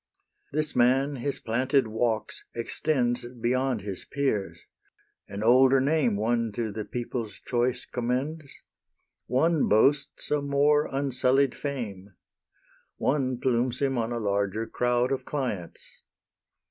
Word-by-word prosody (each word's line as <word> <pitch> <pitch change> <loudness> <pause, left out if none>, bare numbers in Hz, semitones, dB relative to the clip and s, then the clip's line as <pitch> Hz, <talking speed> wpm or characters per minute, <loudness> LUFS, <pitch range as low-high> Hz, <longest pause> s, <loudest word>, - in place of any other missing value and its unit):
This 155 +1 -1
man 135 +3 +3
his 135 +3 -2
planted 130 +4 +1
walks 110 0 -2
extends 120 0 0 0.2
Beyond 125 0 0
his 100 -2 -6
peers; 135 -9 -2 0.7
an 100 +1 -5
older 130 +3 +6
name 135 -4 +2
One 115 +2 0
to 110 -1 -2
the 105 +1 -5
people's 120 -4 -4
choice 125 0 -1
commends; 135 +5 -3 0.8
One 155 +5 +2
boasts 140 +7 +2
a 150 -1 +2
more 145 +1 +3
unsullied 135 -1 +1
fame; 105 -9 -6 0.8
One 130 -3 0
plumes 125 -1 +1
him 135 -3 +1
on 115 +1 -1
a 120 - -2
larger 100 0 -1
crowd 125 +2 0
Of 135 - -1
clients. 115 - -5
125 Hz, 120 wpm, -27 LUFS, 115-135 Hz, 0.8 s, older